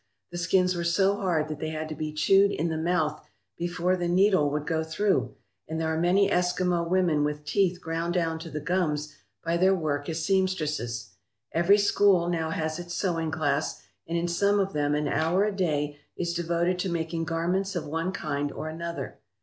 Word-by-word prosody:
The 175 - -4
skins 180 +1 +2
were 175 -1 -2
so 190 +4 +3
hard 170 -6 0
that 155 -1 -5
they 155 - -3
had 155 0 -4
to - - -4
be 155 0 -4
chewed 195 +6 +4
in 165 -1 -1
the 160 - -2
mouth 160 -2 0 0.3
before 175 +1 0
the 175 -1 -2
needle 185 -4 +4
would 150 +1 -2
go 160 0 0
through, 195 +6 0 0.3
and 160 +1 -3
there 160 0 0
are 160 - -1
many 190 +3 +4
Eskimo 180 -2 +1
women 175 -5 +2
with 150 0 -3
teeth 185 0 +1
ground 165 +1 -2
down 165 -2 0
to 165 0 -8
the 150 - -4
gums 150 -3 -1 0.3
by 170 +1 +1
their 190 +2 +4
work 145 -4 -2
as 160 -1 -2
seamstresses. 155 - -1 0.4
Every 170 +5 +4
school 200 -3 +3
now 165 -2 -1
has 160 0 -2
its 175 0 -6
sewing 165 -4 -1
class, 155 -2 -1 0.2
and 170 +1 -1
in 170 +1 0
some 200 +4 +2
of 195 0 0
them 145 0 +1
an 150 0 0
hour 160 +7 +2
a 210 -1 -1
day 150 -6 -1 0.2
is 170 -1 -1
devoted 170 +1 0
to 185 - -1
making 165 -1 -2
garments 180 +4 -1
of 175 - -2
one 165 +4 -2
kind 145 -5 -2
or 155 - -5
another. 170 +1 -6
170 Hz, 200 wpm, -27 LUFS, 155-180 Hz, 0.4 s, chewed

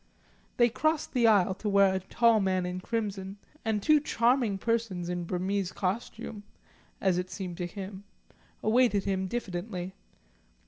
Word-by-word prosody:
They 240 - +6
crossed 310 +6 0
the 240 -3 +4
aisle 200 -4 +4
to 210 +3 -4
where 200 -1 +5
a 190 - 0
tall 230 +4 +3
man 185 -2 +1
in 180 0 -3
crimson, 200 -3 -3 0.3
and 220 -3 -1
two 305 -1 +5
charming 240 -6 +2
persons 210 -5 -1
in 175 -1 -2
Burmese 185 +2 -1
costume 210 +2 -3 0.6
(as 185 -3 +2
it 180 0 -4
seemed 180 -4 -6
to 175 - -2
him) 195 +1 -8 0.6
awaited 220 -3 +3
him 190 -1 -1
diffidently. 185 -3 -4
200 Hz, 145 wpm, -29 LUFS, 185-230 Hz, 0.6 s, They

